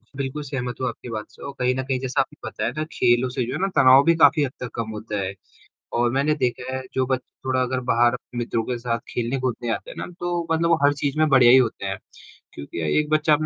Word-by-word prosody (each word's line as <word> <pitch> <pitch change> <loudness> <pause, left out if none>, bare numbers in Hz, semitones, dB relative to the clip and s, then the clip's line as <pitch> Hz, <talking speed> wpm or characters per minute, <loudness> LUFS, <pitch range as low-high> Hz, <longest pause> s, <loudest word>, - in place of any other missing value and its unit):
बिल्कुल 140 +2 -4
सहमत 125 -3 -4
हूँ 130 - 0
आपकी 120 +1 -7
बात 110 -2 -4
से - - -18
और 140 - -6
कहीं 125 0 +2
न 130 - -2
कहीं 130 -1 -1
जैसा 130 0 -2
आपको - - -7
पता - - -4
है 115 - 0
ना, 155 - 0
खेलों 120 +1 +2
से 125 0 -2
जो 125 - -4
है 150 - -3
ना 195 - +2
तनाव 130 +1 +7
भी 170 - +5
काफ़ी 160 -2 +5
हद 130 - -2
तक 125 - -5
कम 115 -2 -3
होता 105 -1 -5
है 95 0 -3 0.7
और 120 0 +3
मैंने 140 +4 +2
देखा 125 +1 -1
है 130 - -4
जो 130 -1 +1
बच्चे 130 -1 -4
थोड़ा 130 -1 +1
अगर 130 0 -1
बाहर 120 +1 +4 0.2
मित्रों 115 -1 -1
के 125 - -2
साथ 115 0 -2
खेलने-कूदने 120 0 -2
आते - - -8
हैं - - -10
ना, - - -4
तो 175 -1 -2
मतलब 165 +1 +2
वो 165 - +5
हर 145 - +6
चीज़ 140 +1 -2
में 155 0 +4
बढ़िया 130 -4 +6
ही - - +9
होते 120 -6 +1
हैं। 95 0 -2 0.6
क्योंकि 70 +4 -7 0.2
एक 150 0 0
बच्चा 155 0 +3
130 Hz, 255 wpm, -23 LUFS, 120-140 Hz, 0.7 s, ही